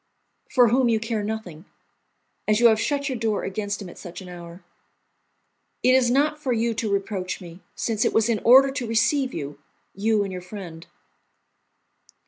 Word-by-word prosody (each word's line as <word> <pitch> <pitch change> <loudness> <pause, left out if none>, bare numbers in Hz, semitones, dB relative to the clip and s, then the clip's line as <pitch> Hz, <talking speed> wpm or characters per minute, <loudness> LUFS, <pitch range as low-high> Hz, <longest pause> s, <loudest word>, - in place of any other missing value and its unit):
"For 245 -4 +5
whom 250 +1 +3
you 225 -1 +2
care 220 -1 -2
nothing, 205 -6 -6 0.8
as 215 0 +3
you 235 -1 +7
have 220 0 +2
shut 280 +1 -1
your 260 -4 -3
door 220 -2 -1
against 205 +1 -3
him - - -8
at 175 - -12
such 175 - -9
an 185 -2 -10
hour." 175 0 -10 1.2
"It 255 - +5
is 255 -2 +4
not 295 +4 +2
for 270 -4 -2
you 230 0 0
to 215 -1 -2
reproach 195 -2 -2
me, 175 -1 -11 0.2
since 225 -2 -1
it - - +2
was 225 0 +2
in 230 -3 +1
order 265 +3 +6
to 255 -3 -4
receive 255 +4 +1
you, 145 -6 -6 0.3
you 210 +1 +1
and 195 - -5
your 180 - -6
friend." 180 -3 -9
220 Hz, 180 wpm, -24 LUFS, 190-240 Hz, 1.2 s, you